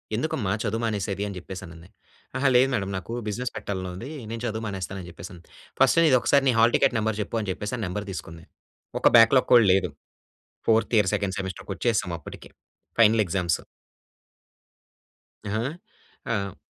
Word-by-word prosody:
ఎందుకమ్మా 115 -6 -1
చదువు 115 +1 -1
మానేసేది? 100 -3 -2
అని 100 - -6
జెప్పేసనంది, 90 -2 -9 0.5
"అహా! 135 +1 +3
లేదు 125 +2 +6
మేడం 100 -4 -1
నాకు 105 +5 -7
బిజినెస్ 120 +4 -3
పెట్టాలని 95 -4 -4
ఉంది. 115 +9 -7 0.2
నేను 115 0 -5
చదువు 110 -1 -3
మానేస్తాను" 95 -1 -5
అని 90 - -10
జెప్పేసంది. 85 0 -11 0.4
"ఫస్ట్ - - +5
నీది 135 -6 +5
ఒకసారి 140 +2 +3
నీ - - +3
హాల్ 115 +1 +5
టికెట్ - - +3
నంబర్ 110 -1 -1
చెప్పు" 110 - -3
అని 105 - -5
జెప్పేసని 105 +6 -4
అని 110 - -2
నంబర్ 105 +3 -4
తీసుకుంది. 80 -3 -8 0.5
ఒక - - +4
బ్యాక్‌లాగ్ 115 +3 +6
కూడా 120 -2 +7
లేదు. 95 -2 +1 0.8
ఫోర్త్ 115 +1 +2
ఇయర్, 105 -3 +4
సెకండ్ 95 -2 -2
సెమిస్టర్‌కి 95 +1 -6
వచ్చేసాం 115 -5 0
అప్పటికి. - - -11 0.5
Final 110 -1 +6
exams. 85 -2 0 1.9
ఆ! - - -4 0.8
ఆ! 100 -4 -2
105 Hz, 160 wpm, -25 LUFS, 95-115 Hz, 1.9 s, కూడా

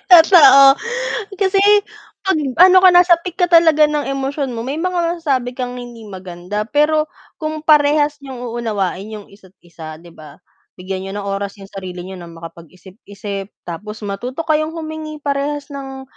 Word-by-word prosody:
Totoo, 320 -6 +8 0.8
kasi 390 -1 +2 0.6
'pag 380 -4 +1 0.2
ano 370 +1 +8
ka 375 - +7
nasa 355 0 +6
peak 360 0 -7
ka 360 -2 +2
talaga 325 -3 +5
ng 300 -1 -2
emosyon 275 0 -3
mo, 230 0 -5
may 275 +4 -4
mga 350 -1 -1
masasabi 260 -6 -1
kang 250 -1 -4
hindi 240 -2 -10
maganda 185 +2 -6
pero 305 +2 +2 0.3
kung 310 0 -5
parehas 295 -1 +3
n'yong 265 -3 -9
uunawain 215 -3 -3
yung 210 -2 -9
isa't-isa, 175 -5 -13
'di 175 - -15
ba. 150 -1 -14 0.4
Bigyan 190 +1 -6
niyo 195 - -6
ng 205 - -4
oras 195 0 -4
yung 195 - -13
sarili 185 -2 -8
niyo 190 +1 -9
na 175 - -10
makapag-isip-isip 185 +4 -10 0.2
tapos 210 +6 -8
matuto 240 +9 -5
kayong 310 0 -1
humingi 315 -2 -7
parehas 285 +1 -3
ng, 270 -1 -8
260 Hz, 155 wpm, -17 LUFS, 195-310 Hz, 0.8 s, Totoo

